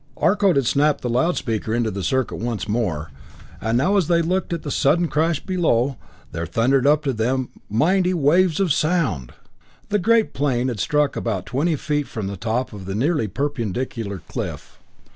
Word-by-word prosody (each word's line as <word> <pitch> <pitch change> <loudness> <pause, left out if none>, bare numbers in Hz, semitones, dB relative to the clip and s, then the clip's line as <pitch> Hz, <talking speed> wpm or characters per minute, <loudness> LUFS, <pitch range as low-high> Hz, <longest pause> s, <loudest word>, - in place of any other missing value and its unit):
Arcot 200 -2 +3
had 140 -2 +2
snapped 145 +4 +2
the 125 - -2
loud 145 +9 +1
speaker 110 -1 -2
into 115 -2 0
the 100 - -4
circuit 130 +7 0
once 115 -3 -3
more, 90 - -2 0.5
and 110 +2 +1
now 185 +11 +2
as 185 -6 +2
they 170 -1 +3
looked 185 +2 -1
at 170 -2 -3
the 145 - -4
sudden 165 +7 +2
crash 160 0 +1
below, 140 -8 +1 0.4
there 85 0 -4
thundered 130 +3 +2
up 150 +1 +4
to 135 -3 0
them 125 +3 -1 0.2
mighty 180 - +2
waves 170 +1 +3
of 185 -7 +3
sound! 140 - 0 0.6
The 210 - +1
giant 225 +3 +2
plane 130 -3 0
had 115 -4 -4
struck 150 +6 +1
about - - -2
twenty 155 +6 0
feet 150 0 -2
from 110 -3 -5
the 100 +1 -4
top 115 +5 -2
of 95 -2 -8
a 95 - -2
nearly 135 0 +1
perpendicular 115 - -3
cliff. - - -6
135 Hz, 180 wpm, -22 LUFS, 115-165 Hz, 0.6 s, up